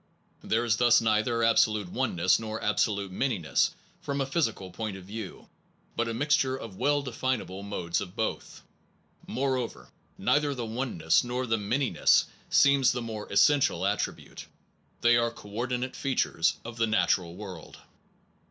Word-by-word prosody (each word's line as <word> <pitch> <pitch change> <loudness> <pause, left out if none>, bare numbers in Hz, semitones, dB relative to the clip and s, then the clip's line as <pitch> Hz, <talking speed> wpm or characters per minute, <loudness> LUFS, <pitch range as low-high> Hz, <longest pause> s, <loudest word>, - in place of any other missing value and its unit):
There 115 +2 0
is 110 -2 +2
thus 120 0 +5
neither 115 +1 +1
absolute 110 -3 +3
oneness 90 -5 +1
nor 110 0 -5
absolute 100 -2 0
manyness 95 - +1 0.3
from 140 - -3
the 135 - 0
physical 125 - -1
point 110 -1 -5
of 95 - -12
view, 105 0 -8 0.5
but 115 - 0
a 115 - -2
mixture 135 0 +1
of 115 -7 -9
well 145 +6 +1
definable 125 -6 -3
modes 90 -4 -2
of 90 -2 -8
both. 110 - -4 0.6
Moreover, 125 - -2 0.3
neither 145 +6 +1
the 120 -2 -4
oneness 110 -9 +1
nor 125 +1 -2
the 115 -2 0
manyness 120 +6 +2 0.2
seems 140 -2 +5
the 125 -1 -3
more 110 -2 -6
essential 100 - +3
attribute, 100 +1 -3 0.5
they 120 0 +5
are 115 0 +2
co 110 -3 -13
ordinate 125 +3 -3
features 130 -11 0
of 120 0 -8
the 115 -1 +2
natural 90 -5 +1
world. 95 -5 -9
115 Hz, 145 wpm, -28 LUFS, 100-130 Hz, 0.6 s, thus